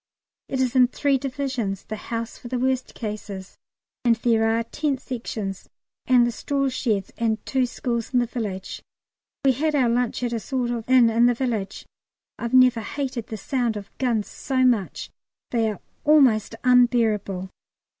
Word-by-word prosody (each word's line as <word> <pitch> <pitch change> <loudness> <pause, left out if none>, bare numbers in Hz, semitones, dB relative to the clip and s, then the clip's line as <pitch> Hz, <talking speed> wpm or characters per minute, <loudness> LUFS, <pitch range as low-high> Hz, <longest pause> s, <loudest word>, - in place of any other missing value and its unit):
It 265 - -2
is 260 -1 0
in 250 -1 +6
three 275 +1 +1
Divisions 255 -8 -3
the 215 - -5
house 230 +1 -5
for - - -10
the 250 +1 -2
worst 260 +1 -1
cases 210 -3 -6 0.4
and 235 -2 +4
there 225 -1 +2
are 225 +1 +1
tent 280 +3 -2
Sections 220 -7 -5 0.4
and 250 -2 +5
the 240 - 0
straw 275 +3 -1
sheds 215 -7 -1
and 225 -2 +1
two 260 -2 +1
schools 235 -2 -3
in 255 - +2
the 245 - +3
village. 210 -6 -5 0.6
We 270 - +6
had 300 +4 0
our 255 -4 +3
lunch 245 +1 0
at 240 -1 -1
a 230 - -1
sort 245 +2 -2
of 235 0 -4
inn 250 -3 +6
in 235 +2 +4
the 245 - +2
village. 225 -6 -3 0.5
I've 235 +2 -1
never 255 -3 +6
hated 255 -1 -4
the 220 - -5
sound 235 +1 -1
of 200 -1 -8
the - - -8
guns 225 -4 +1
so 260 -2 0
much; 230 -7 0 0.4
they 230 -2 +2
are 210 - -5 0.2
almost 260 -9 +4
unbearable. 225 -7 +2
240 Hz, 175 wpm, -24 LUFS, 220-255 Hz, 0.6 s, in